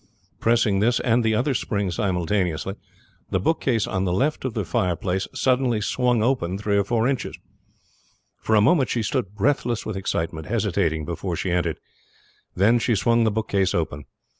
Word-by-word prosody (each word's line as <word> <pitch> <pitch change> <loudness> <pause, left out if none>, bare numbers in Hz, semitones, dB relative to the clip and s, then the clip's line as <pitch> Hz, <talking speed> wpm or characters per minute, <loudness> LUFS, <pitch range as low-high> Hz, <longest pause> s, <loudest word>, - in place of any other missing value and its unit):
Pressing 110 -4 +2
this 120 +4 +2
and 120 0 +2
the 110 -1 +2
other 130 +6 +1
spring 100 -5 -1
simultaneously, 90 -1 -1 0.6
the 95 - 0
bookcase 120 - +1
on 95 -1 -2
the 90 - 0
left 140 +11 0
of 130 -4 -3
the 105 -4 -1
fireplace 90 +2 -1
suddenly 125 -3 +1
swung 120 +1 +1
open 110 -8 0
three 105 0 -1
or 100 - +3
four 115 +3 +1
inches. 135 -2 -2 1.0
For 110 - +1
a 105 - +5
moment 135 +4 +3
she 115 - 0
stood 100 -1 -2
breathless 120 0 0
with 110 - -4
excitement, 80 -4 -3
hesitating 95 -8 0
before 85 +2 -3
she 90 - -2
entered; 85 -2 0 0.8
then 110 +6 +4
she 115 0 +1
swung 115 +4 +2
the - - +4
bookcase 100 -3 0
open. 75 -3 -2
105 Hz, 165 wpm, -23 LUFS, 95-120 Hz, 1.0 s, a